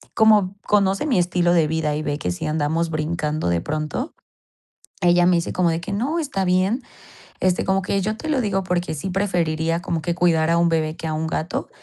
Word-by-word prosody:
como 210 -3 +4
conoce 200 +5 +2
mi 250 -10 +2
estilo 175 0 +2
de 160 -3 +3
vida 155 -1 -1
y - - -3
ve 145 -1 -2
que 90 - -2
sí 90 - -5
andamos 160 +2 0
brincando 155 - -1
de 85 -1 +1
pronto, 155 - -3 0.9
ella 175 -1 +4
me 180 - +4
dice 170 - -2
como 180 -2 +2
de 165 +1 -2
que 175 - -6
no, 275 +11 -1
está 265 - -2
bien. 185 +7 +1 0.6
Este, 185 -1 +1
como 195 0 +1
que 200 +1 0
yo 215 +3 -2
te 310 - -6
lo 290 - +2
digo 195 -3 0
porque 180 -2 -1
sí 155 +6 -4
preferiría 170 -4 0
como 165 -2 -2
que 170 - 0
cuidar 165 -2 +2
a 170 - +3
un 170 - +3
bebé 160 -1 0
que 160 - -5
a 155 - -2
un 155 +1 -2
gato. 160 +1 -3
175 Hz, 220 wpm, -22 LUFS, 160-195 Hz, 0.9 s, como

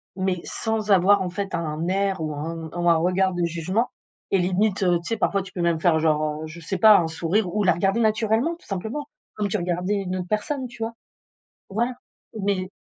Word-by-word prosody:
mais 185 -1 -1
sans 220 -1 -2
avoir 195 +1 +5
en 185 - -1
fait 195 +1 -4
un 160 0 -2
air 195 -1 0
ou 155 -1 -2
un 160 +2 -5
ou 175 0 +1
un 170 - +6
regard 185 +3 +2
de 175 0 -1
jugement, 175 +8 -1 0.4
et 195 - +4
limite, 190 +3 +1
heu, 175 -2 +4
tu 170 - -10
sais, 225 - 0
parfois, 200 -2 +1
tu 185 0 -10
peux 180 - -4
même 170 -2 +1
faire 160 -2 +4
genre, 155 -1 0
heu, - - -5
je 155 +2 -10
sais 185 +4 -3
pas, 210 +2 +8
un 165 - 0
sourire 175 +4 -1
ou 210 0 +1
la 180 - +5
regarder 195 +6 +1
naturellement, 220 +7 +2
tout 340 - -22
simplement, 220 +9 -4 0.3
comme 210 -1 -1
tu 215 - 0
regardais 180 +2 -1
une 190 -2 -2
autre 180 -1 -4
personne, 255 +6 -1
tu 235 -1 -7
vois? 225 +1 -3 0.8
Voilà, 235 +5 0 0.5
mais- 195 -2 -1
185 Hz, 220 wpm, -24 LUFS, 170-210 Hz, 0.8 s, pas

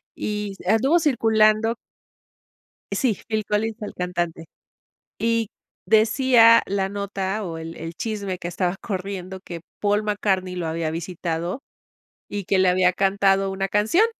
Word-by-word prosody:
y 210 -1 -3
anduvo 230 - +3
circulando 225 -6 +3 1.2
sí, 240 -8 +1
Phil 220 -1 -1
Collins, 215 +1 -1
el 210 - -5
cantante. 175 -2 -3 0.7
Y 230 -1 +1 0.4
decía 230 +1 +6
la 195 -1 -1
nota 200 0 -3
o 165 -4 -5
el 165 +1 -7
el 165 +1 -6
chisme 200 -1 -4
que 175 - -6
estaba 180 +1 -1
corriendo, 190 -2 -5
que 170 -3 -8 0.2
Paul 205 +1 +1
McCartney 195 -3 -1
lo 175 -2 -3
había 160 0 -2
visitado, 170 - -4 0.7
y 205 -2 -4
que 195 - +2
le 185 -1 +4
había 180 0 +3
cantado 195 0 +2
una 195 0 -2
canción. 220 - +3
200 Hz, 135 wpm, -23 LUFS, 180-220 Hz, 1.2 s, decía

